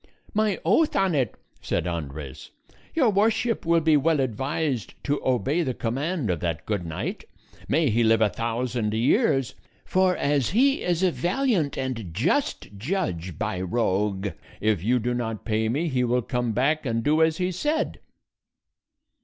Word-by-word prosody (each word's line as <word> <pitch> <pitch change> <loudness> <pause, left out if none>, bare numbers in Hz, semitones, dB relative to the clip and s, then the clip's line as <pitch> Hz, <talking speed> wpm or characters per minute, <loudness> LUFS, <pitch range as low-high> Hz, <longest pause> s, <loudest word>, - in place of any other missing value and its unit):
"My 210 -3 +1
oath 260 - +3
on 195 -2 +2
it," 130 -8 0 0.3
said 85 - -1
Andres, 75 -5 -5 0.5
"your 260 -9 +4
Worship 225 +1 +1
will 165 0 +4
be 160 -1 +4
well 150 +1 +3
advised 135 0 -2
to 145 0 -1
obey 130 - +1
the 130 -7 -2
command 135 - -1
of 85 - -2
that 80 -2 -3
good 100 -5 -2
knight 80 - -4 0.4
may 155 -5 +2
he 115 +2 +2
live 115 0 +4
a 110 - +4
thousand 115 -1 -2
years! 135 - +2 0.3
for 185 -1 +2
as 140 -3 +1
he 270 +7 +3
is 175 0 0
a 185 - +4
valiant 180 - 0
and 125 -9 -3
just 155 - 0
judge, 95 - -2
by 105 -4 -2
Roque, 100 -1 0 0.3
if 105 -5 +1
you 120 +4 +3
do 120 +1 -1
not 115 -3 -3
pay 110 -1 0
me, 150 +9 0
he 130 -4 +1
will 125 0 +1
come 125 0 -1
back 140 +7 +1
and 115 -4 -1
do 155 +4 +3
as 160 0 +3
he 185 0 0
said." 295 - -1
130 Hz, 160 wpm, -25 LUFS, 110-170 Hz, 0.5 s, your